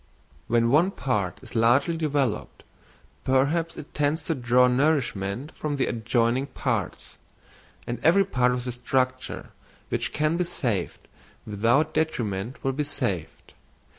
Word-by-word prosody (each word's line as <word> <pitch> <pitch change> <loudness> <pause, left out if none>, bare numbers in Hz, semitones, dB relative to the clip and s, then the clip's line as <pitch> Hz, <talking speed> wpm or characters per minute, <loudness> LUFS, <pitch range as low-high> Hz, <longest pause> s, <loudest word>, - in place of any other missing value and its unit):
When 115 0 +2
one 160 +7 +5
part 105 - -2
is - - -12
largely 120 +8 +3
developed, 145 -8 -1 0.6
perhaps 145 +6 +1
it 150 - -10
tends 150 +2 0
to 165 - -1
draw 125 -2 +4
nourishment 125 -3 0
from 150 -1 -3
the 135 - +1
adjoining 120 +3 0
parts; - - -3 0.7
and 120 - -4
every 195 +5 +5
part 125 -9 +2
of 125 0 -2
the 125 - -2
structure 130 +1 -2 0.4
which - - -2
can 155 +2 +1
be 180 - +2
saved 120 - -2 0.4
without 115 +9 +2
detriment 115 -7 -2
will 135 - 0
be 150 +3 -1
saved. 145 - -3
130 Hz, 135 wpm, -26 LUFS, 120-150 Hz, 0.7 s, one